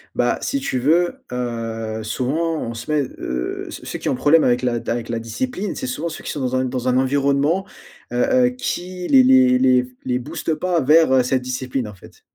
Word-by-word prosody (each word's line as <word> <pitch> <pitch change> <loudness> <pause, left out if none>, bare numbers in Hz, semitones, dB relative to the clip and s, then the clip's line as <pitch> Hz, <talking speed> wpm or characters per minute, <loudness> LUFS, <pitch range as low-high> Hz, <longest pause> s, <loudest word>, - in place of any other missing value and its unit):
Bah, - - +1
si 275 - -1
tu 275 - -2
veux, 165 +7 +1
heu, 115 -3 -4
souvent 155 +9 -1
on 115 - -4
se 115 +7 -6
met, 150 -2 +2
heu 60 0 -4
ceux - - -9
ceux - - -4
qui - - -3
ont - - +2
un - - 0
problème 150 +5 +4
avec 120 0 +2
la 125 -1 0
d - - -4
avec 120 -1 -2
la 115 -1 -2
discipline, 200 - -3
c'est 260 - -5
souvent 250 -9 -3
ceux 160 - -8
qui - - -3
sont 145 - -4
dans 130 0 -1
un 130 - +1
dans 125 0 -2
un 125 - +2
environnement, 140 +6 +1 0.5
heu, 120 - -2 0.3
heu, - - +2
qui 180 -7 -4
les 130 -2 +6
les 130 -1 +5
les 125 -1 +4
f 125 - -10 0.2
les 125 -1 -1
boostent 160 +4 -3
pas 175 0 0
vers, 155 +1 +5
heu, 130 -1 +5
cette 130 +1 0
discipline, 125 -1 -3
en 105 - -10
fait. 95 - -17
130 Hz, 235 wpm, -21 LUFS, 125-160 Hz, 0.5 s, les